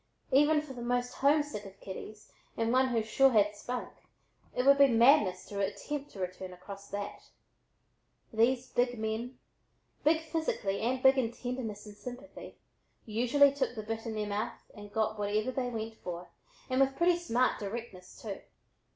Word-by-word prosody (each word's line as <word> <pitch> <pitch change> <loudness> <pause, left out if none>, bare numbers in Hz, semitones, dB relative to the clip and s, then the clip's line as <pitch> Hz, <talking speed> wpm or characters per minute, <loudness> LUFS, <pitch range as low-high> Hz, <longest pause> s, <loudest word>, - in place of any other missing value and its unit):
Even 295 +3 +5
for 285 -3 -8
the 245 - -8
most 245 +1 -1
homesick 285 -6 +2
of 195 0 -12
kitties 210 +2 -9 0.3
and 230 +1 +1
one 260 +1 +4
who 235 -3 +1
"sure 270 +5 +4
had 210 -3 +3
spunk," 245 +4 -5 0.6
it 250 - 0
would 280 0 +7
be 280 - +9
madness 230 -6 +4
to 200 - -6
attempt 275 +9 -3
to 195 - -12
return 185 0 -4
across 200 +2 -10
that. 205 0 -6 1.0
These 245 +3 +2
big 245 0 +1
men, 220 +3 -3 0.7
big 320 +1 +4
physically 315 -12 -2
and 255 +3 0
big 265 0 +7
in 230 -3 0
tenderness 240 -4 -5
and 210 -1 -11
sympathy, 250 +5 -9 0.5
usually 250 +6 +4
"took 280 -3 -1
the 215 - -5
bit 225 +2 -4
in 220 - -3
their 210 -1 -1
mouths 205 +1 -4
and 205 -1 -11
got 215 0 0
whatever 210 +4 0
they 255 -1 -2
went 225 -1 -5
for," 175 0 -7 0.4
and 255 +1 +2
with 270 0 +3
pretty 345 0 +4
smart 255 -6 +1
directness, 200 -3 -7
too. 205 -3 -5
235 Hz, 170 wpm, -31 LUFS, 210-260 Hz, 1.0 s, be